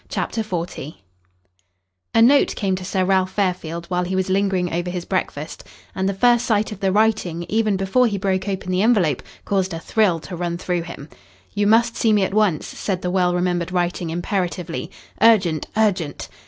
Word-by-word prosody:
CHAPTER 225 Hz, -, -2 dB
XL 185 Hz, -6 st, -2 dB, 1.5 s
A 225 Hz, -, +6 dB
note 275 Hz, +4 st, +4 dB
came 195 Hz, -3 st, 0 dB
to 185 Hz, -, -6 dB
Sir 185 Hz, 0 st, 0 dB
Ralph 190 Hz, 0 st, +1 dB
Fairfield 180 Hz, -4 st, -2 dB
while 180 Hz, 0 st, -1 dB
he 185 Hz, +2 st, -3 dB
was 190 Hz, 0 st, 0 dB
lingering 190 Hz, -3 st, +1 dB
over 175 Hz, +1 st, -1 dB
his 175 Hz, -1 st, -4 dB
breakfast, 155 Hz, -5 st, -3 dB, 0.3 s
and 190 Hz, 0 st, -1 dB
the -, -, -1 dB
first 240 Hz, +3 st, +4 dB
sight 215 Hz, -1 st, +1 dB
of 210 Hz, -, -7 dB
the 195 Hz, -2 st, +1 dB
writing, 200 Hz, -5 st, +1 dB
even 215 Hz, -2 st, +1 dB
before 195 Hz, +7 st, +2 dB
he 205 Hz, -3 st, -2 dB
broke 190 Hz, 0 st, -1 dB
open 190 Hz, -1 st, -3 dB
the 185 Hz, +1 st, +1 dB
envelope, 200 Hz, -, +2 dB, 0.2 s
caused 190 Hz, -3 st, 0 dB
a -, -, -5 dB
thrill 190 Hz, -2 st, +1 dB
to 180 Hz, -, -7 dB
run 170 Hz, 0 st, -3 dB
through 180 Hz, -1 st, -2 dB
him. 165 Hz, -4 st, -9 dB, 0.5 s
"You 205 Hz, 0 st, +1 dB
must 230 Hz, +2 st, +4 dB
see 225 Hz, -2 st, +2 dB
me 205 Hz, -2 st, +3 dB
at 190 Hz, -, -2 dB
once," 205 Hz, -7 st, +2 dB
said 190 Hz, -3 st, -4 dB
the 180 Hz, -, -1 dB
well 180 Hz, -1 st, +2 dB
remembered 175 Hz, -1 st, -1 dB
writing 175 Hz, -1 st, -1 dB
imperatively. 175 Hz, 0 st, -3 dB, 0.3 s
"Urgent, 190 Hz, -9 st, +4 dB
urgent!" 190 Hz, -9 st, 0 dB
185 Hz, 185 wpm, -21 LUFS, 175-205 Hz, 1.5 s, A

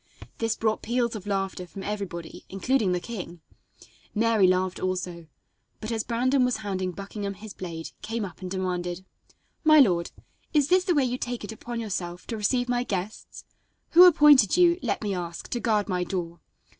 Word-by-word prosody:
This 225 Hz, 0 st, 0 dB
brought 220 Hz, -1 st, 0 dB
peals 235 Hz, 0 st, 0 dB
of 205 Hz, -1 st, -7 dB
laughter 195 Hz, -2 st, -2 dB
from 195 Hz, +2 st, -9 dB
everybody, 190 Hz, -5 st, -5 dB
including 200 Hz, +1 st, +1 dB
the 180 Hz, -, +1 dB
king. 175 Hz, -5 st, -7 dB, 0.7 s
Mary 220 Hz, -3 st, +4 dB
laughed 185 Hz, 0 st, +1 dB
also, 180 Hz, -3 st, -3 dB, 0.5 s
but, 215 Hz, +1 st, -5 dB
as 225 Hz, -1 st, -1 dB
Brandon 255 Hz, +3 st, +2 dB
was 250 Hz, 0 st, +1 dB
handing 185 Hz, -2 st, -2 dB
Buckingham 200 Hz, +1 st, -5 dB
his 205 Hz, +1 st, -10 dB
blade, 165 Hz, -3 st, -7 dB
came 225 Hz, -1 st, -3 dB
up 180 Hz, -1 st, -11 dB
and 185 Hz, -, -5 dB
demanded: 180 Hz, -1 st, -3 dB, 0.6 s
"My 310 Hz, -1 st, +7 dB
lord, 175 Hz, -10 st, +4 dB, 0.5 s
is 290 Hz, -2 st, +3 dB
this 365 Hz, 0 st, +4 dB
the 355 Hz, -3 st, +2 dB
way 280 Hz, -3 st, +3 dB
you 250 Hz, +1 st, -2 dB
take 245 Hz, -2 st, -4 dB
it 205 Hz, -, -6 dB
upon 235 Hz, +2 st, -6 dB
yourself 180 Hz, -5 st, -4 dB
to 230 Hz, -, -4 dB
receive 245 Hz, +4 st, +1 dB
my 245 Hz, 0 st, +1 dB
guests? 200 Hz, -2 st, -5 dB, 0.5 s
Who 355 Hz, +2 st, +9 dB
appointed 295 Hz, -, +6 dB
you, 350 Hz, 0 st, +5 dB
let -, -, -2 dB
me 205 Hz, -2 st, -1 dB
ask, 175 Hz, -2 st, -5 dB
to 240 Hz, -, -2 dB
guard 215 Hz, -4 st, +1 dB
my 180 Hz, -2 st, 0 dB
door? 170 Hz, -2 st, -4 dB
205 Hz, 180 wpm, -26 LUFS, 185-240 Hz, 0.7 s, Who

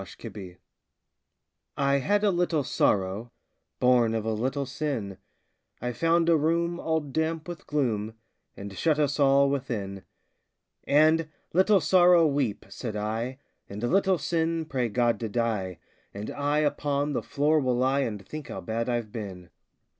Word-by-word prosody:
The 95 Hz, -, -10 dB
Penitent 95 Hz, -6 st, -9 dB, 1.2 s
I 140 Hz, 0 st, +2 dB
had 205 Hz, +9 st, +1 dB
a 205 Hz, -, +4 dB
little 175 Hz, -4 st, +1 dB
Sorrow, 100 Hz, 0 st, 0 dB, 0.5 s
Born 120 Hz, -3 st, +3 dB
of 110 Hz, -1 st, -2 dB
a 110 Hz, -, 0 dB
little 130 Hz, +6 st, -1 dB
Sin, 125 Hz, -, -4 dB, 0.6 s
I 125 Hz, +1 st, -3 dB
found 165 Hz, +4 st, +2 dB
a 170 Hz, -, +5 dB
room 170 Hz, +3 st, +1 dB
all 160 Hz, 0 st, 0 dB
damp 160 Hz, +3 st, -2 dB
with 175 Hz, +2 st, -8 dB
gloom 110 Hz, -7 st, -1 dB, 0.4 s
And 100 Hz, 0 st, -8 dB
shut 150 Hz, -, +1 dB
us 145 Hz, -1 st, 0 dB
all 140 Hz, 0 st, +5 dB
within; 115 Hz, -8 st, -3 dB, 0.8 s
And, 155 Hz, +2 st, +4 dB, 0.2 s
"Little 190 Hz, +3 st, +5 dB
Sorrow, 175 Hz, -1 st, +5 dB
weep," 140 Hz, -8 st, 0 dB
said 115 Hz, -4 st, -6 dB
I, 110 Hz, +5 st, -3 dB, 0.3 s
"And, 105 Hz, +3 st, -7 dB
Little 190 Hz, +7 st, +3 dB
Sin, 165 Hz, -1 st, -1 dB
pray 130 Hz, -5 st, -1 dB
God 120 Hz, +2 st, +1 dB
to 115 Hz, -, -3 dB
die, 105 Hz, -6 st, -1 dB, 0.4 s
And 105 Hz, +1 st, -5 dB
I 145 Hz, +1 st, 0 dB
upon 145 Hz, -1 st, 0 dB
the -, -, -1 dB
floor 150 Hz, +2 st, +1 dB
will 130 Hz, -3 st, 0 dB
lie 130 Hz, +2 st, +2 dB
And 105 Hz, -7 st, -3 dB
think 155 Hz, -4 st, -7 dB
how -, -, -6 dB
bad 115 Hz, +2 st, -2 dB
I've 120 Hz, -3 st, -2 dB
been!" 95 Hz, -6 st, -7 dB
135 Hz, 155 wpm, -27 LUFS, 110-160 Hz, 1.2 s, a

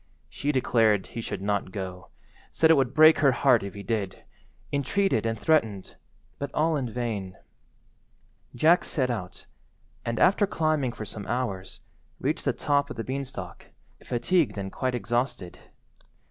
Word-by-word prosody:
She 145 Hz, -, -2 dB
declared 115 Hz, -6 st, +2 dB
he 115 Hz, -, -6 dB
should 100 Hz, -, -5 dB
not 100 Hz, -2 st, -1 dB
go; 95 Hz, -2 st, -6 dB, 0.4 s
said 160 Hz, 0 st, +4 dB
it -, -, +7 dB
would 135 Hz, -4 st, +1 dB
break 155 Hz, +1 st, +7 dB
her 140 Hz, -3 st, +5 dB
heart 125 Hz, -2 st, +4 dB
if 100 Hz, 0 st, -7 dB
he 100 Hz, -, -7 dB
did; 105 Hz, -5 st, -3 dB, 0.5 s
entreated 140 Hz, -, +1 dB
and 115 Hz, 0 st, -1 dB
threatened, 110 Hz, -12 st, +1 dB, 0.4 s
but 140 Hz, -, -3 dB
all 160 Hz, +1 st, +2 dB
in 130 Hz, -5 st, -2 dB
vain. 105 Hz, -6 st, -3 dB, 1.2 s
Jack 160 Hz, +8 st, +4 dB
set 130 Hz, -5 st, 0 dB
out, 105 Hz, -7 st, -6 dB, 0.6 s
and, 115 Hz, 0 st, -3 dB
after 200 Hz, -, +4 dB
climbing 155 Hz, -8 st, 0 dB
for 110 Hz, -2 st, -7 dB
some 105 Hz, -1 st, -8 dB
hours, 105 Hz, -6 st, -3 dB, 0.4 s
reached -, -, -2 dB
the -, -, +3 dB
top 145 Hz, 0 st, +1 dB
of -, -, -6 dB
the 115 Hz, -, -4 dB
beanstalk, 135 Hz, +1 st, -6 dB, 0.4 s
fatigued 140 Hz, -, +1 dB
and 95 Hz, -1 st, -4 dB
quite 130 Hz, -1 st, -2 dB
exhausted. 120 Hz, -6 st, -2 dB
120 Hz, 150 wpm, -26 LUFS, 105-145 Hz, 1.2 s, it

